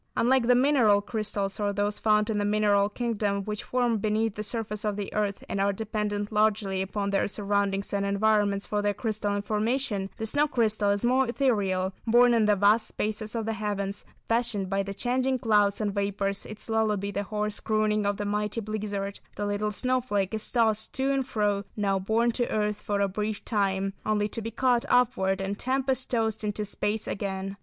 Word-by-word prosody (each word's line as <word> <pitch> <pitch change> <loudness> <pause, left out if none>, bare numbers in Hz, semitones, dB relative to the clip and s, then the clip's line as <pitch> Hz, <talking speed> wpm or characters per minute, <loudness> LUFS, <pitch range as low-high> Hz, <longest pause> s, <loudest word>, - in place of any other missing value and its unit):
Unlike 250 0 +3
the 245 - +6
mineral 245 -6 +4
crystals, 205 -2 -3
or 205 -1 +1
those 205 +1 -1
found 210 0 +2
in 210 - 0
the - - 0
mineral 205 -1 +3
kingdom, 210 -3 -1
which 210 0 -4
form 245 -3 0
beneath 215 +1 0
the 210 - -5
surface 210 -1 -3
of 210 -1 -1
the 205 -1 -5
earth, 205 -2 -1
and 195 - -2
are 200 +1 +3
dependent 210 0 -3
largely 210 -3 +1
upon 200 +1 -2
their 195 - +1
surroundings 200 -1 -1
and 200 0 0
environments 200 0 +2
for 210 0 -1
their 205 0 0
crystalline 205 -2 -2
formation, 215 -1 0
the 220 - -3
snow 290 +6 +2
crystal 220 -6 +1
is 200 +3 +1
most 255 +1 +3
ethereal; 200 -8 +1
born 240 +1 +6
in 225 -2 +3
the 210 0 +4
vast 210 +3 +3
spaces 215 +1 -3
of 225 -2 -2
the 225 - -1
heavens, 205 -2 -3 0.2
fashioned 230 -5 0
by 195 0 +1
the 195 0 -5
changing 255 +3 0
clouds 210 -5 +2
and 210 -2 -1
vapours, 200 0 -2
its 215 0 -8
lullaby 215 -3 0
the 200 - -2
hoarse 210 0 -3
crooning 215 -1 +1
of 205 0 0
the 205 - -3
mighty 210 +2 -1
blizzard, 205 -2 -4 0.2
the 205 - -3
little 205 +1 -1
snowflake 225 -4 0
is 220 -1 -3
tossed 220 -3 +1
to 265 +1 0
and 270 -2 0
fro, 205 -2 0
now 195 -2 +1
borne 225 +5 +1
to 240 +1 -1
earth 210 -1 -1
for 205 -1 -1
a 200 - +3
brief 210 +2 -3
time, 195 -2 0
only 210 -1 +1
to 225 - -5
be 225 - -4
caught 245 +1 +2
upward 235 -6 +2
and 195 +1 -3
tempest 265 0 0
tossed 220 -3 0
into 210 0 -2
space 210 +1 -2
again. 195 -1 -3
210 Hz, 195 wpm, -27 LUFS, 200-225 Hz, 0.2 s, the